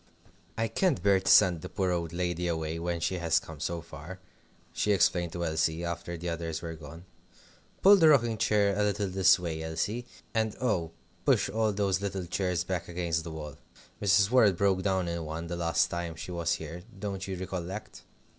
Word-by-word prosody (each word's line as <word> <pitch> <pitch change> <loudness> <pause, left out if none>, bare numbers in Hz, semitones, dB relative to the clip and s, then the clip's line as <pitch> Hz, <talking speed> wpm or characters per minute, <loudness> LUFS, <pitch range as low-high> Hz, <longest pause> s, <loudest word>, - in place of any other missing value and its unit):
"I 115 0 +1
can't 135 - 0
bear 100 -1 +4
to 95 - -2
send 85 -3 +6
the - - -7
poor 95 -2 -1
old 85 -2 -2
lady 90 0 -2
away 80 -1 -2
when 85 0 -2
she 90 +1 -1
has 85 -2 +2
come 80 -2 -11
so 85 +3 -3
far," 85 +3 -10 0.5
she 105 - +1
explained 90 -3 +2
to 85 -1 -2
Elsie, 80 +1 0
after 85 0 -4
the 85 +2 -6
others 85 -1 -3
were 85 -1 -4
gone. 80 +2 -11 0.8
"Pull 200 +1 +9
the 160 -4 +6
rocking 120 -7 +3
chair 105 -2 +2
a 105 - 0
little 105 0 0
this 95 0 +5
way, 85 -3 -4
Elsie. 100 +10 -3 0.3
And 110 -2 0
oh! 95 -10 0 0.3
push - - +3
all 110 0 +1
those 100 -2 0
little 95 -2 -3
chairs 90 -1 -1
back 90 -1 -3
against 85 -2 -2
the 85 - -7
wall. 75 -3 -7 0.4
Mrs. 100 +1 +4
Worrett 110 -8 +5
broke 95 -1 +2
down 95 -2 0
in 85 -1 -3
one 80 +2 -5
the 85 +1 -4
last 85 -1 +2
time 85 -1 -4
she 90 +3 -7
was 85 -1 0
here 80 +2 -6 0.2
don't 95 -1 -4
you 95 -1 -4
recollect?" 95 +2 -6
90 Hz, 195 wpm, -29 LUFS, 85-100 Hz, 0.8 s, Pull